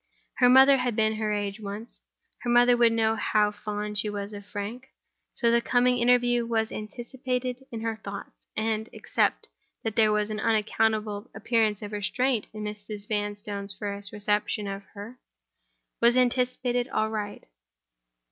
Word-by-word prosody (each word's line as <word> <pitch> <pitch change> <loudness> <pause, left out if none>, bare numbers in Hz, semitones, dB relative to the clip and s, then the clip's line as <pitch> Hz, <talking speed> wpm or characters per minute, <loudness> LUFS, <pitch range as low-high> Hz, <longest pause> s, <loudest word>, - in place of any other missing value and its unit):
Her 250 -1 +6
mother 265 +2 +8
had 250 -3 -1
been 220 0 +2
her 215 -1 -1
age 205 0 -2
once; 210 +2 -6 0.4
her 240 - -4
mother 245 0 +6
would 235 -1 +5
know 225 -1 +2
how 210 -1 +2
fond 210 0 -3
she 215 - 0
was 205 0 -5
of 205 0 -9
Frank. 220 +7 -6 0.5
So 235 -1 +2
the 235 0 +4
coming 245 +1 +3
interview 245 0 +3
was 225 -1 -1
anticipated 250 +3 -4
in 225 -2 -5
her 225 -1 -2
thoughts; 200 0 -7 0.3
and—except 220 0 -1 0.4
that 220 -2 -3
there 220 -2 +4
was 210 0 0
an 215 - -3
unaccountable 215 0 0
appearance 220 -3 +1
of 205 - -6
restraint 220 +3 0
in 215 -1 -7
Mrs. 210 0 -6
Vanstone's 205 -1 -2
first 200 0 -5
reception 210 0 0
of 195 0 -5
her—was 235 +2 -4
anticipated 250 0 +1
aright. 215 -3 -2
220 Hz, 145 wpm, -27 LUFS, 210-240 Hz, 0.5 s, mother